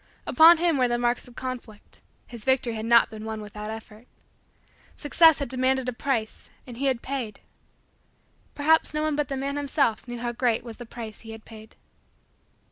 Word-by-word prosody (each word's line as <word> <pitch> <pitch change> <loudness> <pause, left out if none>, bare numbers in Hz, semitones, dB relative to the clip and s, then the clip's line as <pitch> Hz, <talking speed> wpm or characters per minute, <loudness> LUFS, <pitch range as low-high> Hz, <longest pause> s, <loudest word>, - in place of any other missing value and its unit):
Upon 330 +1 +7
him 330 -4 +1
were 250 - +4
the 240 0 0
marks 240 +1 -1
of 245 - -16
the - - -7
conflict. 250 -5 -8 0.2
His 235 -3 -10
victory 260 -2 +1
had 220 0 -4
not 235 -1 +5
been 215 -1 -8
won 220 0 -5
without 210 0 -8
effort. 220 +1 -10 0.9
Success 320 +1 +5
had 280 - -3
demanded 260 +1 0
a 250 - -1
price 235 -3 -3 0.2
and 245 -2 -10
he 275 +2 -1
had 255 -3 -1
paid. 260 -5 -4 1.2
Perhaps 310 +1 +2
no 305 - 0
one 310 -1 0
but 295 -1 -1
the 275 - -4
man 280 +2 -3
himself 275 -5 0
knew 240 0 -6
how 240 0 -3
great 240 -1 0
was 230 -2 -9
the 240 - -10
price 225 -2 -8
he 225 -1 -9
had 220 0 -12
paid. 220 -1 -13
245 Hz, 195 wpm, -25 LUFS, 225-275 Hz, 1.2 s, Upon